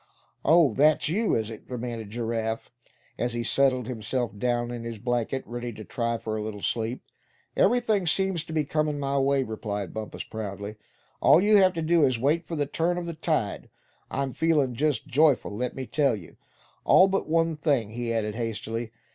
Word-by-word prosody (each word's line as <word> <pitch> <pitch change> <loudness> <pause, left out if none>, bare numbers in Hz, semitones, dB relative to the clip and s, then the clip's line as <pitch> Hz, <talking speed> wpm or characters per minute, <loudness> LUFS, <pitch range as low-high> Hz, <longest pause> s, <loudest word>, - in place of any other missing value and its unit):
"Oh; 160 -1 +6
and 110 - -8
that's 150 +1 +4
you, 210 +6 +1
is 110 0 -1
it?" 110 - -10
demanded 120 -3 -5
Giraffe, 115 0 -3 0.5
as 120 0 -1
he 120 0 -2
settled 130 0 +2
himself 120 -1 -3
down 120 +2 -1
in 120 -1 -5
his 115 -1 -5
blanket, 120 +3 -1
ready 120 0 -5
to 110 - -9
try 115 +1 -2
for 110 -1 -4
a 110 - -2
little 105 -1 -6
sleep. 115 +2 -2 0.5
"Everything 215 -4 +2
seems 190 -1 +1
to - - -9
be 155 -1 +1
comin' 150 0 0
my 140 0 0
way," 135 0 +2
replied 105 -5 -4
Bumpus, 110 -1 -5
proudly. 105 -1 -6 0.5
"All - - +7
you 210 +2 +5
have 190 -2 +5
to 165 -2 -3
do 165 0 +3
is 130 -3 +3
to 115 - -6
wait 155 +5 +1
for 165 - -4
the 145 -2 0
turn 165 +5 0
of 175 - -3
the 170 - -4
tide. 155 -9 -2 0.4
I'm 135 -1 -2
feelin' 150 -6 +2
just 145 -1 0
joyful. 145 -6 +2
let 125 +3 -3
me 130 - -4
tell 140 -2 +2
you;—all 105 - +1
but 195 -4 -1
one 165 0 +2
thing;" 140 -8 0
he 120 0 -3
added, 110 -2 -1
hastily. 115 0 -4
125 Hz, 190 wpm, -26 LUFS, 115-155 Hz, 0.5 s, All